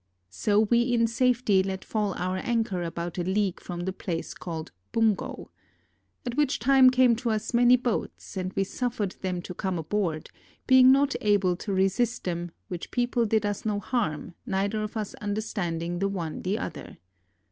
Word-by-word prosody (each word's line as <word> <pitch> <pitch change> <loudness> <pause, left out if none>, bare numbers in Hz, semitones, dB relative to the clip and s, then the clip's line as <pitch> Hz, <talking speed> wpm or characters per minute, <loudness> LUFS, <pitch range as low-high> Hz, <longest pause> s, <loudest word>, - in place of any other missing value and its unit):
So 205 - +2
we 235 +2 +3
in 240 -1 +2
safety 235 -4 +2
let 190 0 -4
fall 210 -3 -1
our 185 +1 -2
anchor 225 -3 -1
about 170 +1 -4
a - - 0
league 190 0 0
from 175 -1 -6
a - - +1
place 175 -3 -4
called 165 -3 -6 0.2
Bungo. 220 -3 0 0.7
At 240 -1 -3
which 295 -2 +2
time 260 +2 +6
came 255 -2 +4
to 240 0 -2
us 215 +1 -2
many 245 +1 +6
boats, 245 -4 -3
and 185 -1 -2
we 195 - +1
suffered 225 -1 -2
them 180 -2 -2
to 180 - -6
come 185 0 -2
aboard, 165 -1 -2 0.3
being 260 -1 +7
not 275 +1 +3
able 200 -4 +3
to 200 - -5
resist 195 +5 +1
them, 175 -1 -3 0.2
which 175 -2 -6
people 240 -1 +1
did 220 0 +1
us 205 -1 -2
no 210 -2 0
harm, 185 - -2
neither 200 +2 -1
of 215 +1 -4
us 215 -2 -3
understanding 175 -5 -2
the 195 - +1
one 170 -5 -4
the 195 +4 -1
other. - - -7
205 Hz, 175 wpm, -27 LUFS, 185-235 Hz, 0.7 s, being